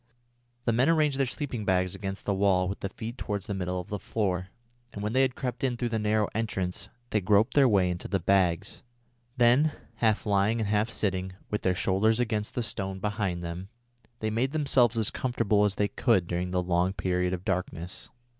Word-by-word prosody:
The 115 - +3
men 125 +6 +3
arranged 150 -4 +2
their 135 - +2
sleeping 125 -4 -4
bags 95 -2 +1
against 95 -1 -5
the 100 - +1
walls 95 -2 +2
with 100 - -4
the 100 - -3
feet 115 +5 -7
towards 100 -2 -3
the 100 - -3
middle 90 -1 -2
of 90 - -8
the 105 - -3
floor, 95 -5 -1 0.4
and 100 - -6
when 105 +2 -2
they 130 - +4
had 130 -2 +1
crept 125 0 -4
in 125 -2 0
through 120 0 -1
the 110 -1 -1
narrow 105 0 +1
entrance, 95 -5 -3 0.2
they 105 - +2
groped 100 +3 +3
their 140 -3 +5
way 95 -4 +3
into 90 0 -3
the 95 - 0
bags. 90 -2 +1 0.6
Then, 125 +6 +4 0.2
half 110 -2 +1
lying 105 +2 +2
and 110 - -1
half 105 +2 +1
sitting, 95 -4 -2 0.2
with 105 - -1
their 90 -1 +1
shoulders 105 +5 +2
against 110 -3 -1
the 120 - 0
stones 95 -3 -3
behind 100 -4 -2
them, 85 +3 -6 0.5
they 110 0 -1
made 125 +6 0
themselves 130 -6 +3
as 110 -2 +2
comfortable 110 -5 +1
as 100 -1 +1
they 105 - +1
could 115 -8 +2
during 90 +1 -2
the 90 0 0
long 90 +1 +1
period 90 -2 0
of 90 0 -4
darkness. 90 -1 -3
105 Hz, 205 wpm, -28 LUFS, 95-115 Hz, 0.6 s, their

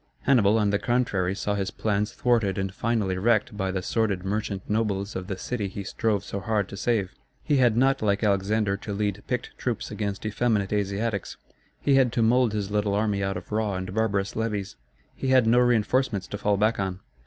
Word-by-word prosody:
Hannibal, 110 -5 +4
on 105 -2 +2
the 100 - +1
contrary, 105 -7 0
saw 105 0 -1
his 100 -2 -1
plans 105 +2 -1
thwarted 115 -5 +1
and 95 -1 -2
finally 105 -4 -1
wrecked 110 0 +2
by 95 -2 -1
the 95 -1 -2
sordid 100 -4 0
merchant 100 -1 -3
nobles 105 -2 -1
of 95 -1 -4
the 95 -2 -4
city 105 +1 -3
he 100 +1 -6
strove 100 0 -1
so 100 - -5
hard 105 -1 0
to - - -7
save. 100 -3 0 0.3
He 145 -2 +2
had 120 -4 +4
not, 135 +2 +3
like 100 0 +1
Alexander, 100 0 +1
to 105 0 -6
lead 105 0 -1
picked 125 -1 -3
troops 120 -4 -3
against 105 -1 -4
effeminate 110 -2 0
Asiatics. 100 0 -2 0.4
He 140 - +2
had 130 -3 +4
to 115 - +2
mould 120 +1 +3
his 105 -2 -3
little 105 -1 +1
army 105 -2 0
out 95 0 -1
of - - -10
raw 105 -2 0
and 95 0 -4
barbarous 100 -2 0
levies. 105 -3 -2 0.4
He - - -4
had 130 -2 +5
no 120 +2 +5
reinforcements 120 -2 +2
to 100 - -4
fall 105 -1 +1
back 110 +2 +2
on. 95 -1 -3
105 Hz, 200 wpm, -26 LUFS, 100-115 Hz, 0.4 s, had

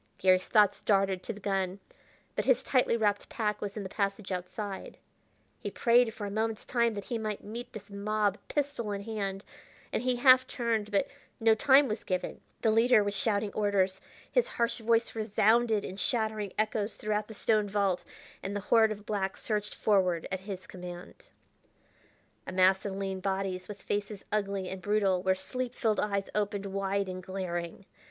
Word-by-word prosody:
Garry's 185 0 +3
thoughts 210 -3 +4
darted 195 -2 +2
to - - -4
the 210 - -9
gun, 195 -1 -1 0.6
but - - -1
his - - +3
tightly 250 -3 +2
wrapped 205 -2 0
pack 215 -4 -1
was 205 0 -4
in 205 - -3
the - - -4
passage 200 0 -2
outside. 190 +2 -5 0.6
He - - -4
prayed 240 -1 +4
for 215 -2 -6
a 200 - -4
moment's 220 +1 -2
time 235 -2 +1
that 200 - -4
he 235 +2 -3
might 215 -2 -4
meet 230 +4 -7
this 205 -1 -10
mob 205 0 0
pistol 280 -7 -2
in 200 0 -4
hand, 200 -3 -3 0.5
and - - +1
he 250 0 +1
half 255 +1 +6
turned; 225 -4 -1
but 205 +6 +1 0.3
no 225 -1 +5
time 265 +5 +5
was 215 -1 -3
given. 185 -1 -3 0.2
The 220 - +4
leader 225 0 +5
was 205 0 -2
shouting 205 +1 +1
orders, 195 -2 +1 0.3
his - - +3
harsh 235 +1 -1
voice 230 +1 +2
resounded 220 0 +2
in 190 - -7
shattering 215 -3 0
echoes 215 0 0
throughout 210 0 -1
the 220 - -10
stone 210 0 +2
vault, 195 -3 +1 0.4
and 200 +1 -4
the - - 0
horde 220 -2 +6
of 210 -1 -6
blacks 195 -2 -2
surged 210 -1 -2
forward 185 -5 +2
at 190 - -1
his 190 -1 -7
command. 180 -1 -10 1.2
A - - -4
mass 190 +2 +4
of 195 - -4
lean 195 -1 -3
bodies, 190 -1 -2
with 205 -1 -9
faces 205 0 -3
ugly 200 -2 -1
and 190 0 -6
brutal 200 -2 +2
where 190 0 +2
sleep 250 +5 -4
filled 220 -4 +1
eyes 200 -2 0
opened 205 -1 -1
wide 195 0 -1
and 185 0 -5
glaring! 180 -1 -4
205 Hz, 180 wpm, -30 LUFS, 195-220 Hz, 1.2 s, half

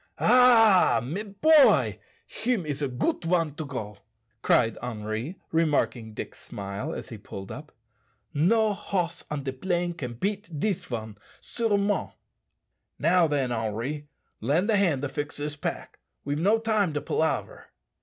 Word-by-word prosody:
"Ah! 225 - +6
mes 185 - -4
boy. 295 +9 +4 0.3
Him 225 -5 -1
is 145 -1 -3
a 145 - +1
goot 135 - -1
one 165 -3 +1
to 155 - -5
go," 105 -7 -6 0.4
cried 115 -2 +3
Henri, 115 - -4
remarking 140 -8 0
Dick's - - -7
smile 100 +9 -6
as - - -6
he 115 - -8
pulled 95 -1 -9
up. 150 +2 -9 0.6
"No 210 +8 +3
hoss 180 -3 -3
on 150 -2 -3
de 135 -1 -3
plain 175 +4 -1
can 125 -8 -6
beat 195 - -3
dis 200 +1 -1
one, 110 -4 -5 0.2
surement." 205 -3 0 0.8
"Now 170 +2 +4
then, 140 -4 0
Henri, 120 +6 -3 0.3
lend 160 - +1
a - - +4
hand 170 -9 +2
to 145 - -1
fix 145 +2 -4
this 145 0 -4
pack; 145 - -5 0.3
we've 145 +1 -1
no 205 +7 +4
time 215 -6 +1
to 145 - -2
palaver." 160 +3 -2
155 Hz, 145 wpm, -27 LUFS, 125-200 Hz, 0.8 s, Ah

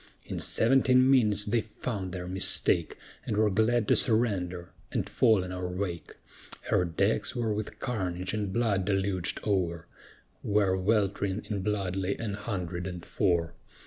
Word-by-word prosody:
In - - -5
seventeen 130 +2 +4
minutes 105 -6 +3
they 115 +2 +1
found 105 -3 -5
their 90 0 -5
mistake, 95 +1 +1 0.3
And 105 - -2
were 105 -1 +3
glad 110 +2 +2
to - - +5
surrender 95 -7 +1 0.2
and - - -1
fall 110 -5 +3
in 90 - -6
our 90 0 -3
wake; 90 -2 -4 0.6
Her 90 - +3
decks 100 +10 0
were 115 -3 0
with 105 0 -5
carnage 95 -7 -3
and 105 -3 -2
blood 105 -3 +1
deluged 95 -3 -1
o'er, 85 -5 0 0.6
Where 100 -2 +2
welt'ring 100 0 0
in 100 -2 -1
blood 95 -2 -1
lay 95 0 -1
an 110 -3 -4
hundred 95 -4 -4
and 90 -2 -7
four. 85 -4 0
100 Hz, 150 wpm, -29 LUFS, 90-110 Hz, 0.6 s, to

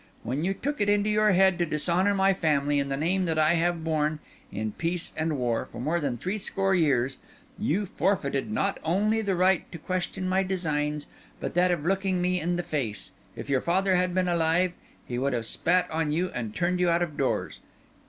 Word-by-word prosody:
When 130 +7 -2
you 195 +2 0
took 290 +6 -3
it 205 - +2
into 205 +1 +2
your 215 0 +3
head 190 -1 +4
to 175 - +2
dishonour 175 +6 +1
my 195 0 +4
family 145 -5 +1
and 140 0 -1
the 135 - -1
name 180 +5 +1
that 160 -2 -1
I 155 +1 +4
have 170 -1 0
borne, 155 -1 0 0.3
in 110 +1 -3
peace 170 +7 -3
and 160 -1 -1
war, 120 -3 -1
for 115 - -8
more 155 +7 0
than 140 -6 -2
three 190 - -3
score 195 0 0
years, 135 -7 +2 0.4
you 200 +7 0
forfeited, 175 -6 -1
not 200 -2 0
only 210 +7 +1
the 200 -3 0
right 185 0 +2
to 170 - -6
question 185 +2 -3
my 190 +1 +2
designs, 150 -6 -1 0.3
but - - -4
that 180 +1 +3
of 170 -4 -1
looking 190 0 +1
me 180 +1 +1
in 175 +2 0
the 175 - -2
face. 115 - -3 0.2
If - - -7
your 135 -2 +1
father 190 +2 +2
had 180 0 +1
been 185 -1 +2
alive, 170 +1 +2 0.3
he 120 0 -3
would 140 +1 0
have 115 -2 -2
spat 180 +9 +1
on 160 -1 0
you 175 +4 0
and 115 -4 -4
turned 180 +1 0
you 180 -1 +3
out 170 +1 +2
of 155 -4 -5
doors. 135 - -1
175 Hz, 210 wpm, -27 LUFS, 150-185 Hz, 0.4 s, head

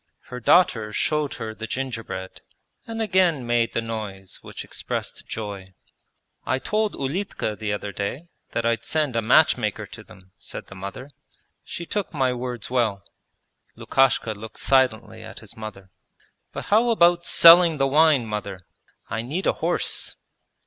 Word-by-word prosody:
Her 125 - -6
daughter 115 -6 +3
showed 150 +6 0
her 110 0 -5
the 110 +1 -7
gingerbread 115 -8 -5 0.5
and 225 -1 -3
again 180 - +2
made 120 -1 +1
the 115 - -1
noise 105 -4 -6
which - - -8
expressed - - -5
joy. 100 -4 -6 0.7
'I 130 - 0
told 215 +9 -1
Ulitka 140 - -3
the 105 -1 -3
other 105 0 -3
day 100 - -4 0.3
that 115 - -1
I'd 115 0 +1
send 150 -4 -1
a 115 - +2
matchmaker 115 -3 +3
to - - -12
them,' 95 0 -18
said - - -8
the - - -13
mother. 100 +9 -8 0.5
'She 170 - -7
took 200 -1 -3
my 130 -3 +1
words 125 -2 -5
well.' 115 -7 0 0.7
Lukashka 130 -4 +2
looked 110 +1 -10
silently 130 -5 +1
at - - -10
his - - -11
mother. 100 -4 -9 0.6
'But - - -6
how 230 +3 +5
about 175 -6 +4
selling 170 -1 +8
the 135 - +2
wine, 145 -2 +4
mother? 105 -3 -5 0.5
I 110 +1 -3
need 150 +11 -4
a - - +3
horse.' - - -1
120 Hz, 150 wpm, -24 LUFS, 110-155 Hz, 0.7 s, selling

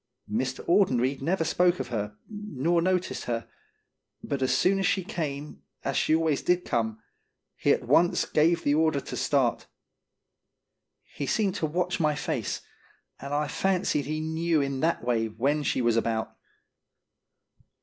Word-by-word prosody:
Mr. 130 +4 -2
Audenried 135 -9 +2
never 165 +4 +1
spoke 180 +2 +2
of - - -4
her, 105 -3 -3
nor 175 - -1
noticed 185 0 -1
her, 115 -1 -3 0.8
but 140 -1 -3
as 130 - +2
soon 195 +1 +3
as 195 - +2
she 190 - +1
came, 150 -7 -5 0.2
as - - -1
she 155 - +3
always 160 -3 +1
did 180 0 +1
come, 110 -2 -1 0.6
he - - +2
at - - +2
once 175 +1 +4
gave 165 +2 +2
the 145 - +2
order 155 -1 +2
to - - -7
start. - - +1 1.4
He 140 - -6
seemed 200 +2 +1
to 160 - -1
watch 180 +4 -1
my 155 -2 +2
face, 140 - -3 0.6
and 140 +1 -7
I 150 +1 0
fancied 180 -5 0
he 155 +1 -2
knew 160 +1 0
in 140 -1 -1
that 165 -1 0
way 115 -2 +1
when 135 +8 0
she 130 -3 0
was 120 -1 +3
about. 115 -1 -1
150 Hz, 155 wpm, -27 LUFS, 130-175 Hz, 1.4 s, once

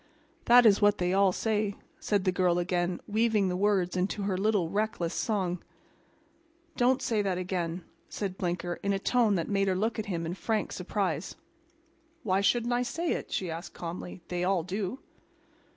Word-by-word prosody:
"That's 235 -4 +7
what 205 0 +4
they 180 0 0
all 195 -1 +4
say," 210 0 -1 0.2
said 205 -2 0
the 185 - +2
girl 180 -1 +2
again, 175 0 0
weaving 215 -2 +2
the 180 - -1
words 190 -2 +1
into 190 +3 -1
her 195 -1 0
little, 200 -2 +1
reckless 200 -3 -1
song. 185 -5 -1 1.1
"Don't 255 +2 +2
say 220 -3 +1
that 190 -3 -1
again," 180 -1 -3 0.3
said 195 -3 -4
Blinker 175 -1 -3
in 200 0 0
a - - +1
tone 225 +1 +2
that 165 -3 -1
made 195 -1 +1
her 190 - +2
look 220 +4 -1
at 215 - -3
him 170 -4 -2
in 165 - -3
frank 215 +3 -1
surprise. - - -2 0.9
"Why 195 -3 +1
shouldn't 235 +4 +2
I 245 - +2
say 330 +7 -2
it?" - - -3
she 180 -3 -2
asked 170 +2 -7
calmly. 175 +1 -6
"They 180 0 -2
all 185 -2 +1
do." 195 +6 -3
195 Hz, 175 wpm, -29 LUFS, 180-215 Hz, 1.1 s, That's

